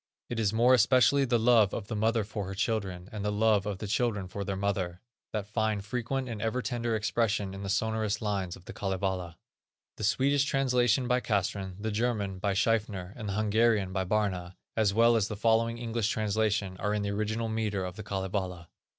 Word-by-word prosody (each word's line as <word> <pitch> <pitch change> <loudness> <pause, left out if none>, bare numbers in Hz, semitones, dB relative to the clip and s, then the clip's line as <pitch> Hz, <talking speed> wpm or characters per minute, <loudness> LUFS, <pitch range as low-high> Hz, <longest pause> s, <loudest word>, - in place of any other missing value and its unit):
It 120 - -2
is 105 -3 +2
more 120 +3 +4
especially 125 +3 +5
the 120 -2 +2
love 115 -3 +4
of 110 - -4
the 110 - -3
mother 110 +1 +1
for 100 -1 -5
her 100 - -5
children, 95 -4 -2
and 105 -2 -5
the 105 - 0
love 105 -1 +2
of 100 -2 -2
the 105 - -6
children 105 -2 0
for 100 +2 -5
their 100 0 -3
mother, 95 -3 -2 0.3
that 105 -3 -2
find 110 -1 -1
frequent 125 +4 -2
and 110 -4 -5
ever 115 +3 -1
tender 120 -2 -1
expression 105 -2 0
in 95 - -7
the 100 - -4
sonorous 110 0 0
lines 100 -4 -2
of 90 - -16
the - - -8
Kalevala. 95 -3 -2 0.6
The - - -6
Swedish 135 +6 +3
translation 125 -2 +2
by 125 0 +2
Castrén, 100 -4 -1
the 110 +1 -2
German, 105 -4 -1
by 100 +1 0
Schiefner, 100 -3 0
and 110 -4 -5
the - - -2
Hungarian, 110 -2 +2
by 95 -1 0
Barna, 95 -3 -1 0.2
as 110 -3 +3
well 115 +3 +5
as 110 -3 +2
the 110 - -4
following 115 +1 +2
English 115 -2 -1
translation, 105 -3 0
are 105 +3 -1
in 105 - -1
the 100 - -1
original 110 +2 -1
metre 110 -4 -1
of 90 -1 -6
the 110 - -7
Kalevala. 95 -3 -3
105 Hz, 200 wpm, -29 LUFS, 100-115 Hz, 0.6 s, especially